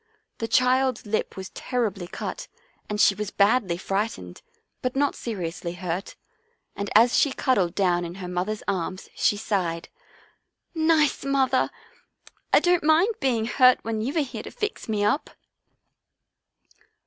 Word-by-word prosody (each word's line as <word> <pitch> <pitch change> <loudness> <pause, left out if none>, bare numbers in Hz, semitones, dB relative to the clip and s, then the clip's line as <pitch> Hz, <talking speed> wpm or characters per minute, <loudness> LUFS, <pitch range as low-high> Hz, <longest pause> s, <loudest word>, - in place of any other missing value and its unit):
The 225 - -2
child's 255 +1 +2
lip 210 -1 -2
was 190 0 -6
terribly 210 -8 -2
cut - - -6 0.4
and 210 0 -3
she 205 - +6
was 210 0 -4
badly 200 -4 +2
fright 195 +4 -1
ened, 90 -1 -11 0.4
but 255 0 -2
not 285 +1 +2
seriously 175 -6 -5
hurt, 180 +1 -4 0.6
and 200 0 -4
as 235 +3 +6
she 285 - +3
cuddled 205 -11 +1
down 175 -3 +2
in 170 0 -6
her 190 -2 -7
mother's 180 +4 -3
arms 185 -1 -3
she 205 - +1
sighed, 180 -6 -2 0.5
" - - -54 0.2
Nice 300 -2 +1
mother! 270 -2 +2 0.8
I - - +7
don't 355 -2 +2
mind 325 +8 +4
being 240 -5 +1
hurt 255 +1 +5
when 225 -1 -2
you 270 +9 -2
are - - +4
here 275 - -5
to - - -8
fix 425 - -4
me 205 -1 +1
up." 220 +9 0
215 Hz, 150 wpm, -25 LUFS, 190-260 Hz, 0.8 s, I